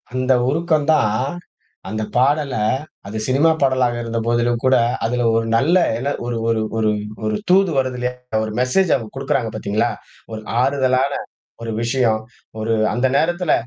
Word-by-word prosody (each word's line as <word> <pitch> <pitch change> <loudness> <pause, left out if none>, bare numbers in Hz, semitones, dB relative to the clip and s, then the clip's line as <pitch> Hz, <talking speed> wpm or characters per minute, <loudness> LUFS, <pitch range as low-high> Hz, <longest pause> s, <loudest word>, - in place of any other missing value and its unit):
அந்த 130 +1 +2 0.2
உருக்கம் 155 0 +1
தான் 110 -8 +2 0.7
அந்தப் 110 +1 -4
பாடல, 140 +2 +2 0.5
அது 105 +2 -5
சினிமா 140 +5 +4
பாடலாக 130 -3 +2
இருந்தபோதிலும்கூட 120 +2 +1 0.3
அதில 120 +1 0
ஒரு 115 0 +1
நல்ல 160 +10 +3 0.5
ஒரு 120 -1 -2
ஒரு 115 -1 +1 0.2
ஒரு 110 -1 +2 0.3
ஒரு 110 0 0
தூது 190 -1 +4
வருதிலயா 125 -1 -2 0.3
ஒரு 110 - -5
மெஜேஸ் 160 +9 +2
அவுங்க 115 -5 -5
குடுக்கிறாங்க 130 -4 -1
பார்த்தீங்களா! 110 +2 0 0.4
ஒரு 110 - -5 0.2
ஆறுதலான 130 0 +2 0.5
ஒரு 115 - -4
விஷயம். 115 -3 +1 0.4
ஒரு 110 +1 0 0.2
அந்த 125 +2 +2
நேரத்துல 175 0 +1
125 Hz, 130 wpm, -20 LUFS, 115-140 Hz, 0.7 s, சினிமா